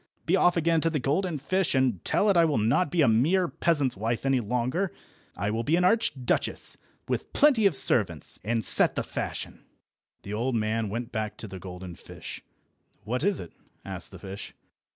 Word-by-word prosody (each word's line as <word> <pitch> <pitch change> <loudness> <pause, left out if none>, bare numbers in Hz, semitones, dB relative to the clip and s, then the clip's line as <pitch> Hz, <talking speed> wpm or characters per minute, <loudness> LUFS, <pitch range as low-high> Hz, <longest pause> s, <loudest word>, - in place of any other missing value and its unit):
Be 170 - +3
off 180 -2 +4
again 165 0 +2
to 165 - +2
the 160 - -1
golden 155 +5 0
fish, 185 +4 0
and 130 -9 +1
tell 210 - +2
it - - +1
I 170 - +6
will 155 -5 +2
not 120 +10 +2
be 170 -1 +2
a - - +4
mere 155 +12 +3
peasant's 145 -7 0
wife 115 +5 -2
any 135 -1 +3
longer. 125 - -1 0.5
I 100 +3 -1
will 110 +1 -1
be 150 +8 +2
an 180 - +2
Archduchess, 180 - +1 0.3
with - - -3
plenty 260 -8 +5
of 180 - -1
servants, - - +1
and 110 +1 -1
set - - +3
the - - -1
fashion." - - -5 0.6
The 100 - -6
old 120 +4 -1
man 110 0 0
went 120 +3 -5 0.2
to 110 - -6
the 95 -1 -8
golden 90 0 -8
fish. - - -9 0.6
"What 125 +5 -2
is 200 0 +2
it?" 85 - -9 0.3
asked - - -5
the - - -11
fish. 95 +1 -8
130 Hz, 190 wpm, -27 LUFS, 110-170 Hz, 0.6 s, I